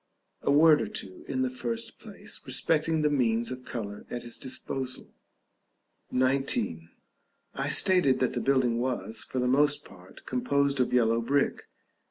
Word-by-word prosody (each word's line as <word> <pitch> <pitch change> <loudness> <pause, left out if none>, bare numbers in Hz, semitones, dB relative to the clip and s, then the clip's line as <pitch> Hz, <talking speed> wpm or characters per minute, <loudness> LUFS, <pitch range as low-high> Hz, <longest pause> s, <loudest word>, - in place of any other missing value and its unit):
A - - -1
word 150 +2 +6
or - - -2
two, 95 -2 -8
in 130 -1 -1
the 130 - 0
first 115 -2 -4
place, - - -8
respecting 160 0 +1
the 150 - +3
means 120 -3 +1
of 130 0 -6
color 105 -4 -6
at 120 -1 -5
his 120 -1 -6
disposal. 130 0 -5 1.0
§ 130 +2 +2
XIX. 80 0 -1 0.6
I 135 +1 -2
stated 165 -2 +4
that 130 - 0
the - - -2
building 130 -4 +2
was, 120 -3 -2
for - - -6
the 125 - +1
most 145 +3 +2
part, 90 -1 -16
composed 140 +2 0
of 125 - +1
yellow 115 -2 +3
brick. 140 +4 0
130 Hz, 160 wpm, -28 LUFS, 115-140 Hz, 1.0 s, word